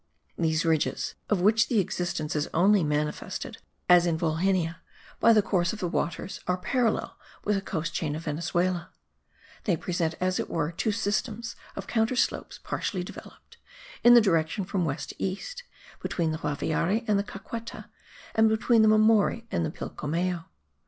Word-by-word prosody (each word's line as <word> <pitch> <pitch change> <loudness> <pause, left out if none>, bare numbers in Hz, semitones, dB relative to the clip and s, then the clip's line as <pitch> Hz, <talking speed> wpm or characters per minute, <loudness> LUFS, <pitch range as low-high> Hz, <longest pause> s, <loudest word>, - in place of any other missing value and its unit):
These 160 -1 +1
ridges, 160 -2 0 0.2
of 205 -4 +2
which 220 +4 +4
the 235 - 0
existence 175 -5 -1
is 150 0 -1
only 195 +3 +5
manifested, 150 0 -2 0.3
as 175 -1 +6
in 165 -2 +1
Volhynia, 170 +1 0 0.4
by 230 - +6
the 215 -2 +5
course 175 -4 +1
of 220 - -7
the 180 - -1
waters, 175 +2 -3
are 180 - +1
parallel 235 +3 0 0.2
with 210 - +1
the 195 - -1
coast 165 -4 -3
chain 150 -3 -2
of 160 - -6
Venezuela; 170 +3 -1 0.8
they 180 -6 +2
present, 170 -1 -1
as 185 0 0
it - - -3
were, 160 -1 -1
two 195 +6 -1
systems 220 +2 -2 0.2
of - - -5
counter 225 +2 +1
slopes 250 - -1
partially 185 -4 -2
developed, - - -12 0.5
in 240 0 +9
the 240 - +9
direction 170 -1 +1
from 185 -2 -1
west 145 -3 -3
to - - -10
east, 475 - -4 0.4
between 165 -3 -1
the 155 - -3
Guaviare 165 - 0
and 205 -2 +3
the - - 0
Caqueta, 230 +3 -7 0.5
and 220 0 +5
between 220 +1 +3
the 220 - +6
Mamori 215 +1 +4
and 170 - 0
the 160 - -1
Pilcomayo. 165 +3 -3
180 Hz, 165 wpm, -27 LUFS, 165-215 Hz, 0.8 s, in